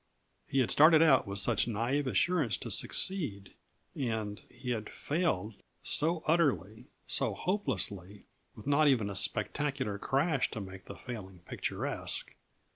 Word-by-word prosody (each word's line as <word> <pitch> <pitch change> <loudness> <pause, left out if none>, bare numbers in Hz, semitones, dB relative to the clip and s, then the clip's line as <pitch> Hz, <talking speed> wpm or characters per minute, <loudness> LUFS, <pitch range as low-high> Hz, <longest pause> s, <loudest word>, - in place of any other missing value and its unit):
He 135 - +1
had 125 - +2
started 155 +2 +7
out 135 -9 +4
with 100 0 -4
such 105 +2 +3
naïve 120 +6 -1
assurance 155 - +1
to - - -5
succeed, 130 - 0 0.4
and 110 -6 -3
he 125 - -6
had 110 -3 -3
failed 140 - -2 0.3
so 160 +2 +2
utterly, 130 - 0 0.2
so - - +1
hopelessly, 105 - -2 0.3
with - - -12
not 145 +2 +3
even 115 -7 +2
a - - -7
spectacular 135 -1 0
crash 140 +3 0
to 110 - -6
make 95 -1 -9
the - - -9
failing 95 -8 -9
picturesque. - - -3
125 Hz, 135 wpm, -31 LUFS, 105-150 Hz, 0.4 s, started